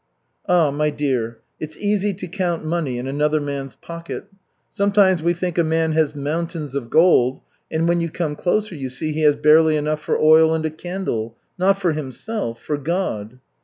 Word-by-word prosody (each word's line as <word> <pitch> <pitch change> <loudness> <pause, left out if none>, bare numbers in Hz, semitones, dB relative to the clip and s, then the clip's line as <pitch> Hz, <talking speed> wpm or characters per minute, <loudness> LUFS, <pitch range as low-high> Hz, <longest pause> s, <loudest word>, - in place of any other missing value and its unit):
"Ah, 170 -5 +4
my 150 +2 0
dear, 130 -6 -2 0.2
it's 155 0 -6
easy 205 0 +1
to 185 -1 -7
count 175 -3 -2
money 155 -6 -1
in 125 - -4
another 150 +3 +1
man's 140 -2 -5
pocket. 170 0 -8 0.5
Sometimes 200 -3 +3
we 170 +2 +2
think 175 0 -2
a - - +5
man 160 0 +1
has 155 -1 +1
mountains 155 0 -3
of 135 -4 -4
gold, 135 -6 +4 0.3
and 160 +1 0
when 170 0 +2
you 165 - -1
come 160 -2 -3
closer 205 +5 0
you 135 -5 -5
see 155 +5 -3
he 155 +1 -2
has 150 -1 +5
barely 155 +1 +5
enough 150 +1 -1
for - - 0
oil 160 +1 +6
and 160 0 -2
a 155 - -1
candle 155 - -4 0.2
not 195 +2 +3
for 180 -4 +1
himself 150 - -4
for 150 -1 -3
God." 135 - -3
155 Hz, 185 wpm, -21 LUFS, 145-175 Hz, 0.5 s, oil